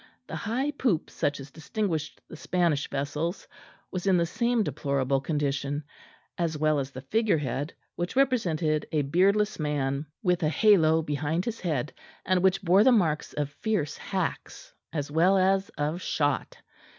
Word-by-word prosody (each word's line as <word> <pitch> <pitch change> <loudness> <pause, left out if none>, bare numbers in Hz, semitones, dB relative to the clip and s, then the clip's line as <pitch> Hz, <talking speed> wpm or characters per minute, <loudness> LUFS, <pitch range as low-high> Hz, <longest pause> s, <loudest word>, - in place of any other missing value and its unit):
The - - -7
high 260 +6 -1
poop 245 - 0
such 145 0 -1
as 135 0 -10
distinguished 160 -1 -3
the - - -10
Spanish 165 -3 0
vessels 150 +6 -3 0.4
was 185 +1 -3
in 190 -2 +5
the 170 - +2
same 235 +5 +1
deplorable 140 -3 0
condition; 145 -1 -1 0.6
as 165 -3 0
well 155 0 +2
as 135 -1 -3
the 130 -1 -9
figure 220 +5 +2
head, 140 +1 -3 0.3
which 175 +6 -3
represented 170 - +1
a 150 -2 +1
beardless 195 +8 +2
man 145 -1 -1 0.2
with 180 -2 +2
a 155 - +2
halo 160 -4 +4
behind 150 +3 -1
his 230 -1 -3
head, 150 -6 -2 0.3
and 185 -1 +2
which 190 +1 +2
bore 190 +3 +5
the 260 - +6
marks 165 -10 +1
of 145 -1 -2
fierce 200 -5 -2
hacks - - -4 0.2
as 145 -2 -3
well 175 +5 +4
as 190 +1 +2
of 150 +4 -1
shot. 145 -5 -1
160 Hz, 160 wpm, -27 LUFS, 145-190 Hz, 0.6 s, the